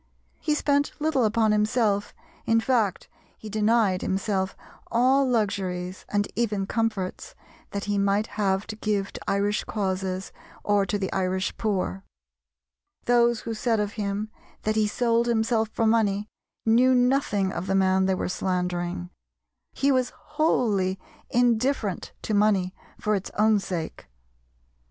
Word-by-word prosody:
He 305 -2 0
spent 285 -1 +1
little 295 -5 +2
upon 220 0 +2
himself, 210 -1 +1 0.4
in 225 0 +4
fact 225 -6 0 0.3
he 215 - -9
denied 215 -3 +2
himself 190 0 -1 0.3
all 260 +3 +3
luxuries, 190 -5 -1
and 205 0 +1
even 210 -4 0
comforts, 215 -4 -2 0.3
that 200 0 -4
he 205 -1 0
might 200 +2 +2
have 195 -2 -1
to 215 - -6
give 210 -2 -1
to - - -8
Irish 205 +1 +1
causes 190 -2 -2 0.3
or 205 -1 +2
to 205 - 0
the 190 -2 -3
Irish 185 0 -1
poor. 185 - -2 1.0
Those 240 -1 +3
who 230 - -4
said 225 0 0
of 205 -1 -1
him 210 0 -3 0.3
that 215 0 0
he 215 -1 +3
sold 235 +1 +1
himself 225 -1 +1
for 225 - -1
money 210 -2 +2 0.4
knew 245 +3 +5
nothing 245 -6 +2
of 185 - -4
the 195 - +1
man 190 0 +3
they 190 - +2
were - - -2
slandering. 180 - -2 0.6
He 280 +1 +1
was 255 -2 +2
wholly 205 - +1 0.3
indifferent 240 -3 +1
to 215 - -2
money 200 -3 +2 0.3
for 210 - 0
its 195 -2 -2
own 215 0 +4
sake. 175 - -5
210 Hz, 140 wpm, -26 LUFS, 190-230 Hz, 1.0 s, knew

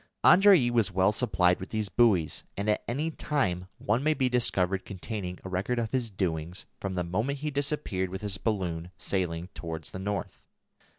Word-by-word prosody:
Andrée 185 -10 +7
was 115 -3 +2
well 95 +1 +3
supplied 95 -6 +2
with 95 - -7
these 110 -2 -1
buoys, 100 -8 +2
and 100 +1 -2
at 105 - +1
any 150 +7 -1
time 95 - -1
one 110 +5 0
may 155 +1 +3
be 130 -2 +1
discovered 95 -6 +1
containing 95 -2 -5
a 95 - -6
record 95 +7 -1
of 115 -2 -1
his 125 -3 0
doings 90 -3 -3
from 95 -1 -3
the 90 - 0
moment 110 +11 -1
he 150 +2 -3
disappeared 140 -10 -1
with 95 +3 -6
his 100 -2 -2
balloon 90 -6 -2
sailing 90 -2 -2
towards 80 -2 -6
the 95 - -6
north. 100 +1 -4
100 Hz, 180 wpm, -28 LUFS, 90-120 Hz, -, Andrée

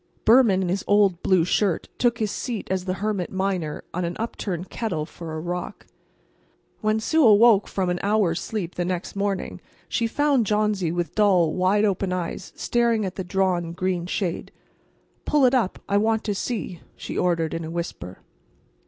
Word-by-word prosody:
Behrman, 220 -5 +5
in 180 - -2
his 190 +2 -1
old 200 -4 +3
blue 185 -4 +3
shirt, 190 -1 0
took 240 -1 +2
his 215 -3 -1
seat 235 -5 -4
as 185 -1 -1
the 185 -1 -1
hermit 200 -5 -2
miner 190 -5 -2
on 180 - -2
an 170 0 -3
upturned 190 -5 -4
kettle 180 -10 -2
for 160 0 -8
a - - -3
rock. 175 +2 -5 0.9
When 215 0 +1
Sue 315 +8 +2
awoke 215 -2 +6
from 185 -2 -1
an 175 - -2
hour's 200 -5 +1
sleep 195 -6 -4
the 175 - -2
next 180 +1 -3
morning 200 -1 -2 0.3
she 230 - 0
found 275 -2 +1
Johnsy 210 -5 +1
with 175 0 -2
dull, 185 -7 +3
wide 190 +3 +2
open 195 -2 0
eyes 180 -2 -4
staring 235 -3 +1
at 185 - -4
the 190 - -5
drawn 180 -2 0
green 180 -1 -2
shade. 180 -2 -3 0.7
"Pull 295 -3 +3
it 250 - +4
up; 235 -8 +1
I 200 - +2
want 220 +1 +1
to 210 - -1
see," 200 -4 -4 0.2
she - - -7
ordered, 170 -3 0
in 165 - -3
a 160 - -6
whisper. 165 - -6
190 Hz, 180 wpm, -24 LUFS, 175-215 Hz, 0.9 s, awoke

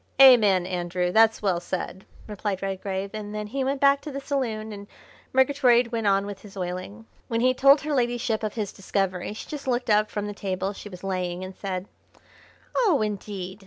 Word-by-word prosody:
"Amen, 215 -9 +7
Andrew, 180 0 -1
that's 225 +1 +4
well 185 -4 +2
said," 185 +1 -5 0.2
replied 205 -2 -4
Redgrave, 195 0 -3
and 210 -1 -6
then 210 0 -3
he 265 +6 -2
went 270 +1 -1
back 280 0 +4
to 300 - -7
the 275 - -4
saloon 235 -7 -2
and 200 0 -9 0.4
Murgatroyd 255 -3 +4
went 225 -2 -1
on 195 0 +3
with 200 -1 -7
his 200 -2 -13
oiling. 185 +4 -5 0.2
When 230 0 -1
he 255 +1 +4
told 275 +3 +6
her 300 +1 -2
ladyship 240 -3 0
of 215 0 -3
his 210 -4 -3
discovery 195 -1 -2
she 215 - -8
just 295 -3 -7
looked 245 -3 0
up 210 0 +3
from 205 -1 -3
the 205 - -4
table 190 -1 -3
she 205 - -9
was 180 -1 -11
laying 185 -1 -2
and 185 0 -8
said: 190 -1 -4 0.9
"Oh, 375 - +3
indeed! 200 -2 -5
210 Hz, 195 wpm, -25 LUFS, 190-245 Hz, 0.9 s, Amen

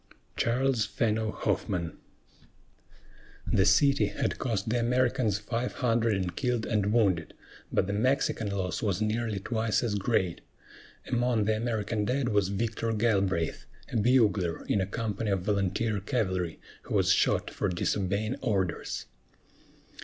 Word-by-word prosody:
CHARLES 125 -1 +1
FENNO 110 -1 0
HOFFMAN. 85 -3 -2 1.5
The 95 0 +2
city 140 +8 +4
had - - -2
cost 110 -6 -1
the 120 +2 +1
Americans 120 -3 +1
five 115 +4 -3
hundred 115 -3 +1
in 95 -2 -1
killed 125 -1 -1
and 105 -2 0
wounded; 95 -8 +1 0.4
but - - +2
the 100 - -3
Mexican 115 -1 +1
loss 95 -4 -2
was 100 -5 0
nearly 110 0 -1
twice 110 +2 0
as 115 -3 0
great. 100 -4 0 0.7
Among 120 -3 +1
the 110 +1 +2
American 110 -2 -1
dead 125 +1 0
was 105 -2 +2
Victor 115 +3 -2
Galbraith, 100 -7 0 0.2
a - - 0
bugler 105 -7 +2
in 100 - +1
a 95 - -1
company 110 0 -3
of 95 -3 0
volunteer 100 +2 0
cavalry, 95 - -1 0.2
who - - -4
was - - +3
shot - - +2
for 105 - -1
disobeying 100 +6 -1
orders. 95 -5 -1
110 Hz, 135 wpm, -29 LUFS, 95-115 Hz, 1.5 s, city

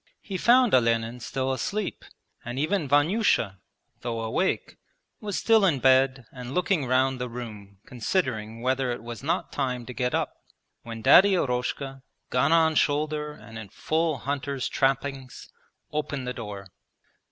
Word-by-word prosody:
He 195 - -6
found 245 +5 +4
Olenin 115 -1 +2
still 130 +2 -2
asleep, 205 - -3 0.4
and 120 +2 -6
even 155 +3 0
Vanyusha, 145 - +2 0.4
though 115 -2 -3
awake, 115 +12 -1 0.4
was 205 -3 -3
still 225 -2 +4
in 175 -7 +3
bed 130 -1 +3
and 125 +1 -8
looking 180 -6 +1
round 130 +1 +2
the 125 - -3
room 105 -5 -8
considering 115 - -2
whether 130 0 +1
it 120 -2 -5
was 120 -1 -7
not 150 +5 -1
time 125 -3 -2
to 125 - -7
get 125 0 -1
up, - - -1 0.5
when 115 -1 -8
Daddy 190 +9 +7
Eroshka, 135 -1 -2 0.3
gun 135 +4 +2
on 160 -1 +4
shoulder 150 0 0
and 115 -3 -11
in 105 -3 -9
full 160 - -1
hunter's 140 -1 -3
trappings, 135 -1 -2 0.4
opened 145 -3 -3
the 125 - -2
door. 105 -5 -7
130 Hz, 145 wpm, -26 LUFS, 120-150 Hz, 0.5 s, Daddy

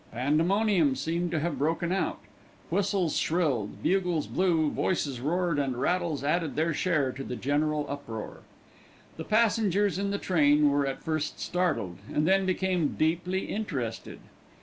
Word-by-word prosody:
Pandemonium 160 - +2
seemed 170 +5 -1
to 165 -2 -1
have 170 0 -2
broken 165 +4 0
out. 190 - 0 0.5
Whistles 195 -5 +1
shrilled, 145 - -1
bugles 180 -4 +1
blew, 165 -5 +1
voices 140 -9 -1
roared, 170 +2 0
and 130 -3 -1
rattles 170 -1 0
added 160 +1 0
their 160 +2 +1
share 155 -5 +1
to 135 +2 -7
the 125 - -5
general 150 +3 0
uproar. 115 -6 -6 0.8
The 160 - -5
passengers 205 -3 +2
in 200 0 -1
the 200 - -1
train 150 -6 +3
were 140 0 +1
at 135 - -4
first 155 -2 -2
startled, 155 - -1
and 150 +2 +1
then 195 0 +3
became 185 -4 0
deeply 175 +4 0
interested. 140 - -4
160 Hz, 145 wpm, -28 LUFS, 145-185 Hz, 0.8 s, train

